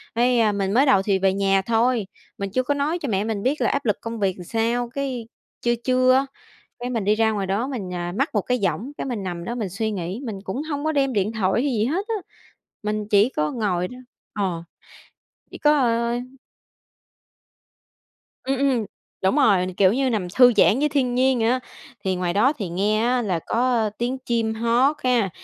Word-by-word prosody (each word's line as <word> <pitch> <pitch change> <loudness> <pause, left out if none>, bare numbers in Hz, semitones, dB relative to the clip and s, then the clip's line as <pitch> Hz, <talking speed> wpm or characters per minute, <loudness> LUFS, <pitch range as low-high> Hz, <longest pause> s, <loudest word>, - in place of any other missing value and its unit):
Thấy 235 -3 +3
mình 195 0 -1
mới 265 +4 +4
đầu 230 -8 +4
thì 195 -1 +1
về 190 0 +2
nhà 195 0 +2
thôi 230 0 +1 0.3
mình 200 0 -3
chưa 255 +4 +1
có 285 - 0
nói 300 +5 -1
cho 280 - -3
mẹ 195 0 0
mình 215 -2 -3
biết 275 +4 0
là - - +3
áp 280 -2 -1
lực 210 - +2
công 230 -1 -5
việc 190 -2 0
làm 180 - -8
sao, 235 +3 -1
cái 255 -3 -4 0.3
trưa 240 0 +1
trưa 255 0 +4
á, 270 +1 +3 0.5
cái, 245 +1 -4
mình 225 -5 -2
đi 210 +1 +3
ra 220 0 +2
ngoài 200 -3 -2
đó 210 +7 -1
mình 210 -9 -5 0.3
mắc 275 +4 0
một 205 - +2
cái 250 0 0
võng, 235 +9 -2
cái, - - -3
mình 235 -6 -3
nằm 175 -2 -5
đó 235 - -4
mình 220 -6 -3
suy 220 +4 -2
nghĩ 190 +3 -4
mình 205 -4 -4
cũng 250 +10 -3
hông 295 -1 -4
có 315 - +1
đem 275 -2 +1
điện 210 +1 0
thoại 220 +2 +1
hay 285 - 0
gì 215 -2 +1
hết 345 - -1
á. 450 - -1 0.7
Mình 210 0 -2
chỉ 210 +3 +4
có 150 - -1
ngồi 185 -6 -1
đó 250 - -11 0.4
ờ, 185 -5 -2 0.9
chỉ - - -9
có, 300 0 +4
ờ 235 -1 +1 2.3
Ừm, 265 0 -1
ừm, 265 -5 +1 0.4
đúng 190 +9 +2
rồi, 200 -10 +4
kiểu 190 0 +5
như 265 +1 +1
nằm 200 -6 -1
thư 250 -1 +8
giãn 210 +4 +5
với 300 +1 +2
thiên 260 -4 0
nhiên 260 0 +3
vậy 225 0 +2
á. 255 +1 +1 0.4
Thì 190 -1 0
ngoài 180 -1 -1
đó 250 +8 +4
thì 205 - -5
nghe 205 +5 0
á 245 +1 +1
là 185 -6 -1
có 235 -2 +1
tiếng 250 +2 -1
chim 230 -3 -1
hót 240 +6 +2
ha 235 -7 +2
230 Hz, 215 wpm, -23 LUFS, 200-255 Hz, 2.3 s, thư